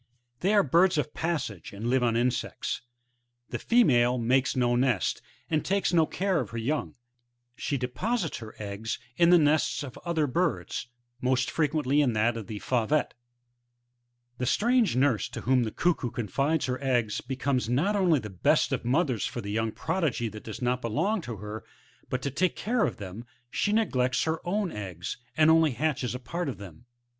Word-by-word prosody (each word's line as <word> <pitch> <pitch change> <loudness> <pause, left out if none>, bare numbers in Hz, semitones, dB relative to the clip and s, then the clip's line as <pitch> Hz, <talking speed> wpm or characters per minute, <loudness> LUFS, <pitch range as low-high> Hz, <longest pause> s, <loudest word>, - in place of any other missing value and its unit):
{Plate - - -40
A^fig. 120 0 -45
6;) 120 - -46
They 195 +4 +2
are 205 - +6
birds 170 +5 +4
of 150 0 -1
passage, 145 - -3
and 105 +4 -4
live 130 +1 +2
t)n 115 -1 +2
insects. 120 +1 -1 0.7
The - - -3
female 125 - +4
makes 125 +3 +2
no 120 -1 +2
nest, 120 -6 +1 0.3
and 155 -2 0
takes 195 -1 0
no 165 -2 +4
6are 190 -3 0
of - - -6
her 115 - -6
young; 140 +7 -2 0.6
she 140 - -2
deposites 170 - -2
her 110 -2 -10
eggs 105 +2 -4 0.2
in 170 0 +5
the 180 - +8
nests 150 -1 +2
of 130 -4 -8
other 170 -3 +1
birds, 145 -2 -1 0.3
most 130 0 +1
frequently 150 -2 +2
in 130 -5 +2
that 115 +2 +2
of 110 -4 -6
the 110 - -5
Faurctte, 130 +4 +1 1.3
The 125 - -1
strange 235 - +3
nurse, 130 -4 +2
to - - -6
whom 125 -1 +2
the 110 - -3
Cuckoo 165 -2 0
confides 140 +8 0
her 130 +1 -3
eggs, 120 -6 +1
becomes 130 -1 -1
not 160 +13 +2
only 180 -6 +4
the 105 -6 -5
best 90 - +2
of - - -1
mothers 130 - +1
for - - -5
the 100 - -5
young 110 +1 0
progeny 135 -10 -1
that 110 0 -10
does 110 +3 -6
not 125 +1 +1
belong 190 - 0
to 120 -7 -6
her, 105 +2 -7 0.5
but 130 0 -2
to 140 - -1
take 180 +6 +1
care 230 0 +1
of - - -5
them 100 +3 -7 0.3
she 205 - 0
neglects 130 - +1
her 160 0 -1
own 195 -1 0
eggs, 95 -4 -5 0.2
and 155 0 +6
only 160 -3 +4
hatches 135 -3 -1
a - - -4
part 170 +5 -3
of 130 - -5
them. 100 +3 -12
130 Hz, 190 wpm, -28 LUFS, 120-160 Hz, 1.3 s, the